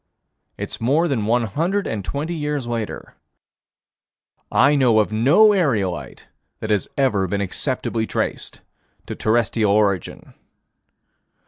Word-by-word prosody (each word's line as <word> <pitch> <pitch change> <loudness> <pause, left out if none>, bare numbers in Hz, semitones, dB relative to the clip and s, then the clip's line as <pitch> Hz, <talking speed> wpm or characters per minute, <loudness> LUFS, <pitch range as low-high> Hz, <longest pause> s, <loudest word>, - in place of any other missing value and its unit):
It's - - -6
more 145 +9 +2
than 115 -9 -1
one 120 +1 +2
hundred 170 - -1
and 105 -3 -3
twenty 150 - -4
years 150 -4 -3
later. 115 -3 -5 1.4
I 140 +2 +4
know 125 -6 +3
of 110 0 +2
no 155 - +5
aerolite 110 - -1 0.3
that 110 - -4
has 105 -2 +1
ever 110 -9 +1
been 100 +3 -2
acceptably 110 +3 -2
traced - - -4 0.4
to - - -6
terrestrial 110 -1 +1
origin. 100 -4 0
120 Hz, 120 wpm, -21 LUFS, 105-145 Hz, 1.4 s, no